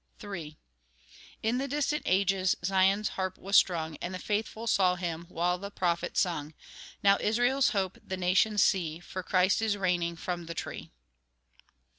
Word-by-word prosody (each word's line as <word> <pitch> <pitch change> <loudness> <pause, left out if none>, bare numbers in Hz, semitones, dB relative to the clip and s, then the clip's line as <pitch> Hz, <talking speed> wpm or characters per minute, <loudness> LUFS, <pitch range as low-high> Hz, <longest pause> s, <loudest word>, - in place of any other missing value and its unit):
III 165 -7 -7 0.9
In 230 +3 +1
the 275 - -2
distant 295 +2 0
ages 190 0 +2
Zion's 195 +2 +3
harp 185 -1 -3
was 195 +1 -2
strung, 160 -5 +3
And 185 +1 -5
the - - -3
faithful 220 +3 -3
saw 185 -5 +3
Him, 170 -1 -4
While 180 +1 0
the 200 +1 -6
prophet 175 -4 -1
sung; 160 -4 -1 0.5
Now 200 0 +5
Israel's 245 +5 +2
Hope 190 -3 -2
the 190 - -5
nations 185 +3 +3
see, 165 -4 +1
For 185 +1 -6
Christ 185 +3 +2
is 215 -2 +1
reigning 175 -3 0
from 175 0 -5
the 170 - -6
tree. - - -6
185 Hz, 155 wpm, -29 LUFS, 175-205 Hz, 0.9 s, Now